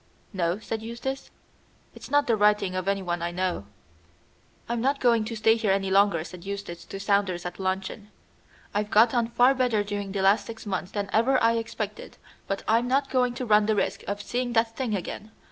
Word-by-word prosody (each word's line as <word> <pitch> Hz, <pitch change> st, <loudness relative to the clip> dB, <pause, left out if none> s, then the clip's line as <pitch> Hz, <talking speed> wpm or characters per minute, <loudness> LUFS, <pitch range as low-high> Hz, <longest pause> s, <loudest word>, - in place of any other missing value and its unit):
"No," 175 Hz, -1 st, 0 dB
said 220 Hz, +1 st, -5 dB
Eustace; 235 Hz, +4 st, -5 dB, 0.6 s
"it's -, -, -11 dB
not 290 Hz, +1 st, +3 dB
the 235 Hz, -, +2 dB
writing 210 Hz, -2 st, +2 dB
of 185 Hz, 0 st, -3 dB
anyone 185 Hz, -3 st, -1 dB
I 170 Hz, -, -1 dB
know." 175 Hz, -, -2 dB, 1.0 s
"I'm 235 Hz, 0 st, -2 dB
not 275 Hz, +3 st, +1 dB
going 235 Hz, -3 st, +3 dB
to 230 Hz, +1 st, -5 dB
stay 220 Hz, +1 st, +4 dB
here 220 Hz, -3 st, -1 dB
any 195 Hz, 0 st, 0 dB
longer," 195 Hz, -4 st, +4 dB
said 175 Hz, 0 st, -10 dB
Eustace 195 Hz, -4 st, -6 dB
to 195 Hz, -, -7 dB
Saunders 195 Hz, -3 st, 0 dB
at 180 Hz, +1 st, -6 dB
luncheon. 190 Hz, +2 st, -3 dB, 0.6 s
"I've 205 Hz, 0 st, -1 dB
got 225 Hz, +3 st, +5 dB
on 235 Hz, -2 st, +2 dB
far 245 Hz, +3 st, +4 dB
better 250 Hz, -5 st, +1 dB
during 205 Hz, -1 st, -4 dB
the 195 Hz, -1 st, -2 dB
last 200 Hz, +1 st, +3 dB
six 225 Hz, -1 st, -8 dB
months 190 Hz, -2 st, -3 dB
than 200 Hz, -1 st, -3 dB
ever 255 Hz, +4 st, +3 dB
I 230 Hz, 0 st, +4 dB
expected, 215 Hz, -2 st, -5 dB, 0.3 s
but 195 Hz, -, -3 dB
I'm 230 Hz, +2 st, +3 dB
not 270 Hz, +2 st, +1 dB
going 250 Hz, -2 st, +1 dB
to 255 Hz, -, -4 dB
run 210 Hz, -2 st, +4 dB
the 220 Hz, -, +2 dB
risk 195 Hz, -1 st, -1 dB
of 205 Hz, +1 st, -3 dB
seeing 245 Hz, +1 st, -2 dB
that 225 Hz, 0 st, +1 dB
thing 245 Hz, -6 st, -1 dB
again. 200 Hz, +3 st, -6 dB
210 Hz, 200 wpm, -26 LUFS, 195-235 Hz, 1.0 s, got